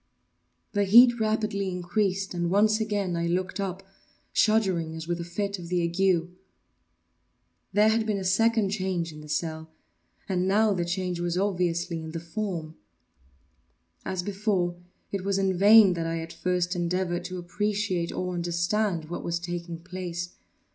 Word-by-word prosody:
The 205 -1 +1
heat 240 +4 +7
rapidly 215 -2 0
increased, 190 +2 -1
and 175 -1 -1
once 215 +3 +3
again 205 -4 -1
I 170 0 -1
looked 180 +3 -1
up, 195 -1 -3 0.5
shuddering 190 -7 +2
as 160 0 -7
with 175 0 -2
a - - -3
fit 200 +3 -3
of 170 - -8
the 180 -1 +1
ague. 170 0 +2 1.4
There 210 +1 +4
had 220 0 +1
been 210 -2 0
a 195 - -4
second 215 +2 +2
change 185 -5 -2
in 150 - -10
the 150 - -12
cell—and 160 +4 -5
now 210 +2 +3
the 175 -2 -1
change 180 0 -2
was 175 0 -1
obviously 175 -3 0
in 160 0 -7
the 165 - -3
form. 170 -2 -4 1.3
As 185 -1 -3
before, 195 -3 0 0.4
it 195 -2 -3
was 195 0 0
in 195 -1 +1
vain 205 +1 +7
that 165 -1 -2
I, 165 0 -2
at 165 0 -7
first, 180 0 -1
endeavoured 175 0 -1
to 185 0 -5
appreciate 190 0 -1
or 180 0 -3
understand 175 +1 0
what 170 +3 -6
was 170 0 -1
taking 170 -1 -5
place. 175 -1 -5
180 Hz, 155 wpm, -27 LUFS, 170-200 Hz, 1.4 s, heat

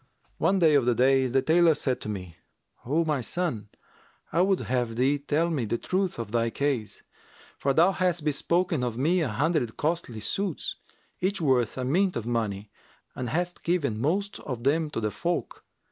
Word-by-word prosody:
One 195 - +3
day 165 -4 +4
of 140 -4 +4
the 120 -1 +3
days 130 0 +3
the 135 -1 +3
tailor 165 +1 +4
said 130 -3 -1
to - - -5
me, 90 -5 -6 0.5
'O 160 +5 +2
my 150 -4 0
son, 120 - -2 0.6
I 170 - +3
would 190 0 +2
have 120 -3 -1
thee 135 +4 +2
tell 155 +4 0
me 135 -8 -1
the 115 +2 -1
truth 185 +5 -1
of 115 -3 -5
thy 115 0 +1
case; 135 -4 -2 0.6
for 140 - +1
thou 165 +7 +5
hast 180 -4 0
bespoken 165 0 +1
of 120 -2 -2
me 170 +7 +2
an 150 - 0
hundred 140 0 0
costly 155 -8 -2
suits, 195 - -2 0.4
each 195 +2 0
worth 130 -8 +1
a 130 - -2
mint 180 +8 +2
of 115 - -3
money, 110 -4 -2 0.4
and 125 -2 -4
hast 175 +6 -2
given 170 -8 +1
the 105 - -6
most 195 - -1
of 125 -4 -6
them 155 +3 +2
to 150 - -3
the 105 -1 -1
folk. 175 +7 -3
140 Hz, 190 wpm, -27 LUFS, 120-170 Hz, 0.6 s, thou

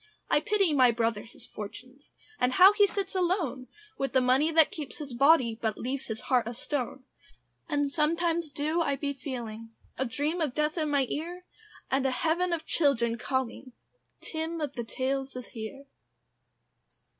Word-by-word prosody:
I - - +5
pity 390 -1 +2
my 255 -3 +6
brother 225 -2 0
his 230 - -14
fortunes, 255 +7 -10 0.3
And 250 +1 +2
how 375 +8 +8
he 410 -1 +5
sits 395 -1 -3
alone, 345 -9 0 0.3
With 275 - -1
the 260 - +5
money 260 +5 +3
that 320 -1 +5
keeps 295 -5 -7
his 285 -4 -7
body, 250 -4 +4
But 220 -2 -1
leaves 265 +2 -4
his 220 -1 -5
heart 245 -4 +1
a 235 - -5
stone. 260 0 -3 0.7
And 290 -2 0
sometimes 330 +1 0
do 305 +4 0
I 285 -4 +1
be 280 +1 -2
feeling 235 -5 -6 0.3
A 265 - +1
dream 295 +8 -2
of 290 -6 -1
death 300 +1 +1
in 310 -3 -1
my 280 -2 +2
ear, 350 +6 -5 0.5
And 270 0 +2
a - - +1
heaven 335 +6 +1
of 325 -2 -2
children 235 -7 +1
calling, 260 0 -3 0.5
"Tim 325 +1 -4
of 295 -3 -3
the 240 - -4
Tales 270 +2 -2
is 250 -1 -6
here." 240 +5 -7
275 Hz, 170 wpm, -29 LUFS, 250-320 Hz, 0.7 s, how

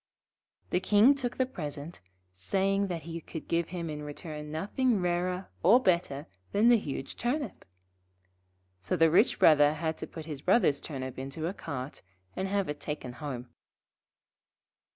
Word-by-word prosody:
The 180 - +3
King 210 +7 +6
took 250 -3 -4
the 260 - +3
present, 150 - -7 0.3
saying 195 - 0
that 170 -3 -4
he 165 0 -6
could 160 - -8
give 170 0 0
him 170 -1 -4
in 150 -1 -5
return 150 0 -7
nothing 210 +8 +1
rarer 180 +1 -1
or 210 +9 +7
better 170 - +1 0.3
than 220 +4 +5
the 240 -2 +6
huge 140 -6 -5
Turnip. 270 +4 -2 1.2
So 95 - -1
the 165 0 +4
rich 195 +8 +4
Brother 150 -1 +6
had 160 0 -2
to - - -5
put 160 -2 -8
his 150 -4 -6
Brother's 180 - +3
Turnip 130 -4 -5
into 135 +4 -5
a 175 - -1
cart, 130 -6 -6 0.3
and 190 - -2
have 200 0 0
it 150 0 -4
taken 150 -5 -5
home. 125 -2 -6
165 Hz, 155 wpm, -30 LUFS, 150-195 Hz, 1.2 s, or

